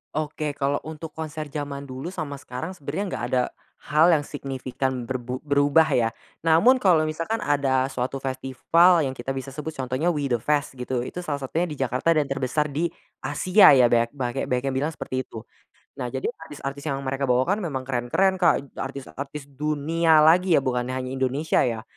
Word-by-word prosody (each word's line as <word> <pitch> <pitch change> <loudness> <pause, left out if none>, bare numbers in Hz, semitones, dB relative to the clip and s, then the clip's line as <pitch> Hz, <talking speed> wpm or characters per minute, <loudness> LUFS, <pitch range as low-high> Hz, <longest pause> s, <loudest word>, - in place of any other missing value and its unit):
Oke, 150 -1 -2
kalau 140 0 0
untuk 160 0 -7
konser 155 -2 -6
zaman 140 -2 -4
dulu 130 +3 -7
sama 155 -6 -5
sekarang 145 +7 -6
sebenarnya 170 +3 -4
enggak - - -4
ada 125 -1 +2 0.3
hal 155 +4 +3
yang 155 -4 +4
signifikan 130 -2 -3
berbu 125 0 -4
berubah 145 +2 +4
ya, 115 -2 +3 0.3
namun 170 +12 +5
kalau 165 -5 +4
misalkan 165 +8 -2
ada 135 -2 +2
suatu 130 +2 -2
festival 135 +6 +3
yang 130 - -2
kita 120 +1 -7
bisa 135 0 -4
sebut 150 +2 -5
contohnya 130 +6 -1
We 145 -4 -1
The 115 - 0
Fest 145 -2 0
gitu, 125 -1 -3
itu 180 - -6
salah 150 -5 -3
satunya 160 +6 -2
di 150 - -6
Jakarta 130 +4 0
dan 155 -3 +3
terbesar 135 +2 -1
di 165 +3 0 0.3
Asia 180 +9 +5
ya 125 - +6
banyak 115 0 +3
bange 130 +1 -2
banyak 125 +1 0
yang - - -5
bilang 150 - 0
seperti 130 -4 -4
itu. 115 0 -9 0.5
Nah 125 - -2
jadi 130 - -2
artis-artis 145 - -8
yang 140 -2 -2
mereka 135 +1 -2
bawa 125 0 +3
kan 205 - +2
memang 145 -9 -3
keren-keren, 135 +10 +1
Kak, 165 -6 +2
artis-artis 140 +1 -6
dunia 155 +3 +2
lagi 175 +2 +5
ya 140 - +4
bukan 125 -2 -1
hanya 130 0 -3
Indonesia 135 +4 0
ya. 115 -2 -2
140 Hz, 185 wpm, -24 LUFS, 130-160 Hz, 0.5 s, ya